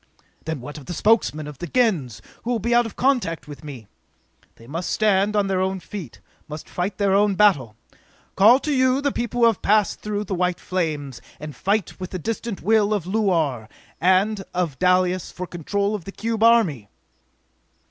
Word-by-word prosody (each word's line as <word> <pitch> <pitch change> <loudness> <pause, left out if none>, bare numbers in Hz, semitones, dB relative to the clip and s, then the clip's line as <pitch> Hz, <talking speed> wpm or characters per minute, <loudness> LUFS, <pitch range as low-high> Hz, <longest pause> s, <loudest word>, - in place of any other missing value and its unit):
"Then 160 -4 -4
what 145 +4 -8
of 135 - -15
the 175 - -4
Spokesmen 205 -9 +2
of 150 -3 -9
the 175 - -5
Gens, 170 - 0 0.2
who 235 - -6
will 245 - +1
be 235 +3 -1
out 240 -1 +4
of 225 - -11
contact 245 - 0
with 145 +1 -10
me?" 135 -7 -9 0.7
"They 115 - -16
must 165 +8 -4
stand 210 -1 +2
on 205 -1 +2
their 190 -1 0
own 190 0 -1
feet, 170 - -9 0.3
must 150 0 -8
fight 185 +2 -3
their 200 -2 +2
own 200 0 +3
battle! 155 - +3 0.6
Call 225 +7 +6
to 300 - -1
you 260 0 +3
the 285 0 0
people 240 0 -3
who - - +7
have 225 -4 +2
passed 210 0 +2
through 210 -1 -3
the 200 - -5
white 180 -1 0
flames, 150 -8 -3 0.2
and 150 -2 -8
fight 200 - -1
with 185 -1 -5
the 185 - -4
distant 225 +3 -4
will 215 -1 +3
of 190 -5 -3
Luar 165 - 0 0.3
and 195 +3 +2
of 170 -6 -2
Dalis 180 0 +2
for 180 - -6
control 200 +5 -2
of 205 -6 -5
the 195 - -7
cube 225 +2 -3
army!" 210 - +3
190 Hz, 190 wpm, -22 LUFS, 160-215 Hz, 0.7 s, who